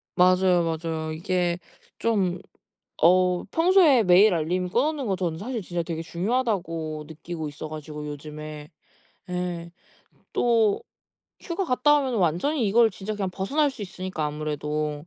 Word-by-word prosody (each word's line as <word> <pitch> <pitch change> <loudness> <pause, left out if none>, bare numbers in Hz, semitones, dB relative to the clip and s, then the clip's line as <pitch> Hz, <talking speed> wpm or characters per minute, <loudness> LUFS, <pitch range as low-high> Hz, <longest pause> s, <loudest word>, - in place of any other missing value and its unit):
맞아요, 180 -1 +4
맞아요. 160 -1 -3
이게 175 0 -1 0.4
좀 190 -6 +1 0.6
어 180 +1 +4
평소에 330 - +5
메일 185 +3 +6
알림 180 +3 -1
꺼 240 +8 +2
놓는 300 -5 -2
거 190 - +1
저는 170 -3 -2
사실 225 +3 -4
진짜 175 -1 -3
되게 165 -1 -4
중요하다고 170 -6 -2
느끼고 160 0 -6
있어 145 +2 -7
가지고 150 -1 -7
요즘에. 150 +1 -8 0.6
예. 175 -1 -3 0.6
또 225 -4 +2 0.6
휴가 370 +2 -3
갔다 295 +1 +3
오면은 260 -5 -1
완전히 200 - +1
이걸 225 +2 +5
진짜 195 +3 -5
그냥 195 -3 -2
벗어날 280 +11 0
수 265 - -13
있으니까 185 -4 -4
아무래도 150 0 -3
180 Hz, 300 characters per minute, -25 LUFS, 160-220 Hz, 0.6 s, 메일